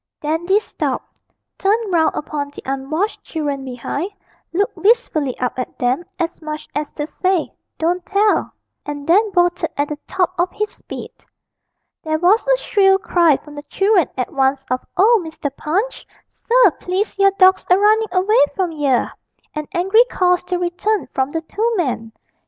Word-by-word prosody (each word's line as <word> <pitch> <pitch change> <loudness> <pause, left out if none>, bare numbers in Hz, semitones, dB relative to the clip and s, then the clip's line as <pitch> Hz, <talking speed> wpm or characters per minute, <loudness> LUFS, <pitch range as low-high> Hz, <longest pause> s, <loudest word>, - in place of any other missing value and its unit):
Dandy 340 +6 +1
stopped, 435 - -5 0.4
turned 415 0 +1
round 320 -2 +3
upon 290 -1 -3
the 285 - -12
unwashed 275 +10 -2
children 290 -4 -3
behind, 265 +7 -4 0.4
looked 400 +6 0
wistfully 385 - +1
up 250 0 -2
at 255 - -5
them, 250 +6 0
as 340 -1 -3
much 305 -1 -6
as 295 0 -3
to 295 - -3
say, 365 +2 -1 0.2
'Don't 350 +2 0
tell,' 410 +3 +1 0.3
and 290 -1 -6
then 410 +7 +4
bolted 350 -2 +1
at 285 +1 0
the 300 -1 -5
top 370 -2 0
of 350 +1 +2
his 425 0 -2
speed. - - -9 0.9
There 315 0 -1
was 375 +9 +3
a - - +4
shrill 390 -5 +3
cry 345 -7 +3
from 295 - -14
the 290 - -7
children 390 - +2
at 250 - -3
once 270 0 +1
of 255 - 0
'Oh, 435 +3 +5
Mr. 310 -3 -5
Punch, 390 +14 -2 0.2
sir, 475 -5 +3
please 385 +3 -2
your 395 0 +6
dawg's 375 0 +5
a 365 - +6
runnin' 430 +2 +3
away 380 +5 +3
from 370 -3 0
yer!' 285 -5 +1 0.4
and 305 -1 -4
angry 385 +7 +4
calls 360 -6 +1
to 360 0 -1
return 360 +4 -1
from 265 0 0
the 325 - -2
two 440 +8 -1
men. 245 -9 -2
350 Hz, 165 wpm, -19 LUFS, 295-395 Hz, 0.9 s, your